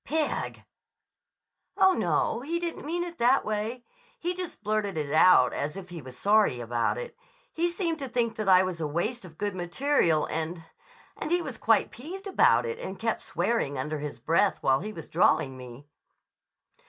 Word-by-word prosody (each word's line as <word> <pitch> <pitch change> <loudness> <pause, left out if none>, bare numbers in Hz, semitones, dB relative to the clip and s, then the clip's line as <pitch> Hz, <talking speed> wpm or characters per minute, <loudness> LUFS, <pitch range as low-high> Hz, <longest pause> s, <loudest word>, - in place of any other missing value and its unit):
"Pig!" 310 0 -2 1.1
"Oh, 380 -1 +6
no. 235 - 0
He 325 +7 -2
didn't 340 -3 -5
mean 345 +2 -1
it 345 -1 -8
that 250 +3 +4
way. 215 +3 -3 0.3
He 350 +1 -2
just 360 - -7
blurted 210 -4 -1
it 145 -1 -2
out 155 -6 +6
as 150 +5 -3
if 185 -2 -9
he 170 -2 -7
was 130 -1 -11
sorry 205 - +3
about 120 0 -1
it. - - -6 0.4
He 340 +2 +1
seemed 340 -2 -2
to 270 -2 -5
think 235 -2 0
that 215 -3 -1
I 185 0 +7
was 180 -3 -4
a 155 - 0
waste 190 +9 -2
of 160 -3 -14
good 205 -2 -2
material 175 - +1
and—and 165 - -7
he 350 +2 +3
was - - -7
quite - - +3
peeved 365 - -8
about 395 - +4
it 465 0 -4
and - - -6
kept - - -1
swearing 185 - -1
under 150 +3 -3
his 145 -4 -5
breath 165 - +2
while 135 0 +3
he 210 +5 -5
was 165 -6 -9
drawing 135 -1 +2
me." 125 +2 -11
205 Hz, 180 wpm, -27 LUFS, -, 1.1 s, I